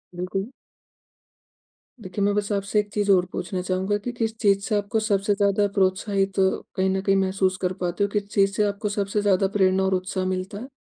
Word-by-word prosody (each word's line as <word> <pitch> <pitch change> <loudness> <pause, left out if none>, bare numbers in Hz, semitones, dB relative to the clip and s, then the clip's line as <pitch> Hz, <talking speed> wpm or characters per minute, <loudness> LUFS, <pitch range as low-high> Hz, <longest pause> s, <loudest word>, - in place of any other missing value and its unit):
बिल्कुल। 190 +4 -3 1.5
देखिए, 195 0 -3
मैं 205 - +2
बस 210 0 -1
आपसे 200 +1 0
एक 210 0 -2
चीज़ 205 -1 0
और 180 -2 +4
पूछना 180 +1 -3
चाहूँगा 190 +3 -1
कि 225 +4 -5
किस 225 -1 -1
चीज़ 200 -3 +3
से 210 - 0
आपको 205 +2 -1
सबसे 205 -1 +1
ज़्यादा 200 0 +2
प्रोत्साहित, 195 +1 +1
कहीं 190 0 0
न 190 - -1
कहीं 195 0 +2
महसूस 190 -1 +1
कर 180 0 0
पाते 180 +3 -1
हो? - - +2
किस 205 -1 -1
चीज़ 195 -1 +3
से 210 - +2
आपको 205 +1 -1
सबसे 205 0 -1
ज़्यादा 195 -1 +3
प्रेरणा 190 -1 +3
और 190 0 +1
उत्साह 185 0 -2
मिलता 185 +2 -3
है? 250 - -7
195 Hz, 200 wpm, -24 LUFS, 190-205 Hz, 1.5 s, और